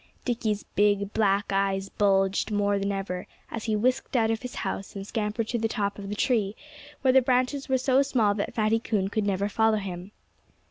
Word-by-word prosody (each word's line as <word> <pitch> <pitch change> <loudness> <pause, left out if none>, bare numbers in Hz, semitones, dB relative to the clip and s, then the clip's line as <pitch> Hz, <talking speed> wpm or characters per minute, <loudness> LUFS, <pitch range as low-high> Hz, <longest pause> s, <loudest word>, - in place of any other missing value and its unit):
Dickie's 220 -4 -1
big, 205 0 +2
black 200 -1 +1
eyes 195 0 0
bulged 195 -1 +2
more 205 -1 +1
than 200 +1 -1
ever 195 -2 -4 0.2
as 225 - -5
he 220 -2 +1
whisked 250 +5 0
out 225 -2 +3
of 225 - -2
his 250 0 -7
house 195 - -4
and 195 0 -5
scampered 215 +1 -2
to 240 - -1
the 225 - +1
top 205 -3 -2
of 195 -1 -7
the 205 - -3
tree, 215 -4 +1 0.5
where 260 -1 +4
the 265 - +7
branches 255 +2 0
were 260 - +3
so 260 +1 +3
small 235 -7 +2
that 200 0 -3
Fatty 220 0 +2
Coon 205 -4 -1
could 210 0 -1
never 200 0 0
follow 220 +1 +2
him. 185 -2 -6
210 Hz, 200 wpm, -27 LUFS, 200-230 Hz, 0.5 s, the